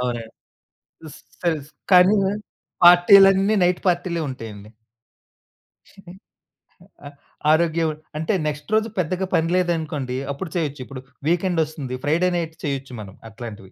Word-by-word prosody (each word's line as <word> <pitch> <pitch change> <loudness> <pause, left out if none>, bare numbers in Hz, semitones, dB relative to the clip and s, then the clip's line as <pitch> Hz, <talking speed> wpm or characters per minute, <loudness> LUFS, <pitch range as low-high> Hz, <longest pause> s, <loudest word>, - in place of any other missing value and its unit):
అవునండి. 120 -2 -4 0.8
స్ - - -16 0.2
తెలుసు. 155 -4 -1 0.2
కానీ 180 +3 +7 0.7
పార్టీలన్నీ 195 +3 +7
నైట్ 180 0 +1
పార్టీలే 175 -1 -1
ఉంటాయండి. 110 -5 -9 1.2
హ్మ్. 190 -2 -14 0.9
ఆహ్, 145 - -13 0.4
ఆరోగ్యం 165 0 +2 0.3
అంటే 160 +7 -1
నెక్స్ట్ 150 +4 -5
రోజు 220 +1 +1
పెద్దగా 185 +3 -1
పని 165 0 +2
లేదనుకోండి 155 -8 -1
అప్పుడు 160 +5 -6
చేయొచ్చు. 145 -5 -2
ఇప్పుడు 135 -2 -9 0.3
వీకెండ్ 175 0 +1
ఒస్తుంది. 145 -5 -6
ఫ్రైడే 170 +5 +2
నైట్ 165 -2 -4
చేయొచ్చు 135 -2 -4
మనం 95 -2 -11
అట్లాంటివి. 110 -4 -10
160 Hz, 120 wpm, -22 LUFS, 135-180 Hz, 1.2 s, కానీ